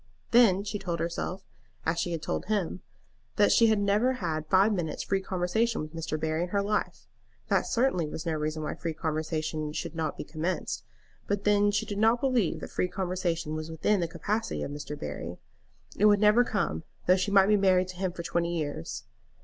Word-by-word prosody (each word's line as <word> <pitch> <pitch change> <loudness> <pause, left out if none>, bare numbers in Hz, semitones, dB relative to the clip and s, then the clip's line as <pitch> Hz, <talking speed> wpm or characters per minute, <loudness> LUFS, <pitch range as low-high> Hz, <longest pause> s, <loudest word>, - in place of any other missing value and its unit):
Then 215 -5 +5
she 205 0 -4
told 175 -4 -3
herself, 170 +3 -3 0.4
as 165 +1 +1
she 175 - -1
had 165 -2 -3
told - - -2
him, 195 -4 -1 0.5
that - - +4
she 230 - +6
had 220 -1 +4
never 205 +5 +2
had 160 -9 -3
five 195 +5 +4
minutes 170 -5 -2
free 195 -1 0
conversation 190 +5 0
with 155 +1 -6
Mr. 160 -1 -3
Barry 160 +1 -1
in 175 - -2
her 200 +1 +1
life. 210 +1 -2 0.4
That - - +2
certainly 230 -10 +1
was 155 +1 -6
no 165 - 0
reason 155 0 -2
why - - -2
free 165 -2 -4
conversation 155 -1 -2
should 155 - -4
not 160 -1 -2
be - - -4
commenced. 160 +4 -3 0.4
But 200 0 -1
then 205 0 +4
she 205 - 0
did 205 -1 -4
not 225 +2 +4
believe 250 -9 +1
that - - -7
free 180 - 0
conversation 180 -4 -2
was 155 +1 -4
within 175 +6 +1
the 170 - 0
capacity 215 +6 -2
of - - -4
Mr. 145 0 -6
Barry. 75 0 -5 0.6
It 210 - +2
would 205 -1 +6
never 210 +3 +6
come, 195 - -1 0.2
though 180 - +6
she 190 +2 0
might 195 -1 +6
be 210 +1 +4
married 185 -2 +3
to 185 - -8
him 190 -1 -1
for 170 -1 -7
twenty 170 +1 -1
years. 145 - -4
180 Hz, 205 wpm, -28 LUFS, 160-205 Hz, 0.6 s, she